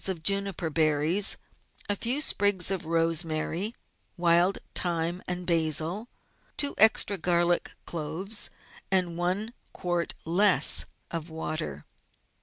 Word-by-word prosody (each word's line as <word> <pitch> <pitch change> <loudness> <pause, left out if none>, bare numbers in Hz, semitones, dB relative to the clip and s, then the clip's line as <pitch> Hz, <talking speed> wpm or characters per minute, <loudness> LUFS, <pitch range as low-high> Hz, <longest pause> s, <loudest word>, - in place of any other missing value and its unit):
of 180 -4 -4
juniper 195 -3 +1
berries, 155 +5 +3 0.5
a 205 - 0
few 245 +8 0
sprigs 200 - +2
of 185 -4 -3
rosemary, 165 +4 -1 0.4
wild 175 +2 +3 0.2
thyme, 175 0 -1
and 180 0 -4
basil, 165 +6 +1 0.5
two 285 -1 +1
extra 215 -3 +5
garlic 175 0 +1
cloves, 175 +7 -3 0.4
and 185 -3 +1
one 185 +6 -2 0.2
quart 175 -1 -2
less 185 +4 +3 0.3
of 165 0 -5
water. 155 - -5
175 Hz, 105 wpm, -27 LUFS, 165-195 Hz, 0.5 s, extra